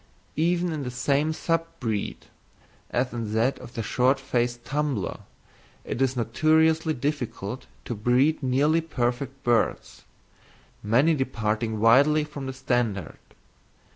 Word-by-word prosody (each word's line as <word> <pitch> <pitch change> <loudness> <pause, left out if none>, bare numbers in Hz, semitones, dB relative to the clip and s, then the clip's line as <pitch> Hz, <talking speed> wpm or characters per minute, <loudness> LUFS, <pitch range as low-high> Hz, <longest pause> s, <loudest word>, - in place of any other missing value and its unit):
Even 175 +1 +1
in 155 -2 -3
the 130 - -3
same 140 +5 +1
sub 165 +1 -1
breed, 110 -4 -3 0.6
as 125 +1 -1
in 115 -3 -4
that 120 +5 +1
of 120 - -12
the 115 - -2
short 130 +4 +2
faced 120 -2 -1
tumbler, 140 -8 -2 0.7
it 120 - -4
is 130 -1 +2
notoriously 155 +6 +2
difficult 125 -4 -4 0.2
to - - -3
breed 125 +8 +2
nearly 145 +5 +2
perfect 135 -2 -3
birds, 120 -2 0 0.8
many 130 +10 +3
departing 110 -5 -1
widely 140 +7 +5
from 150 -3 -7
the 130 - -4
standard. 120 - -1
130 Hz, 125 wpm, -26 LUFS, 120-150 Hz, 0.8 s, widely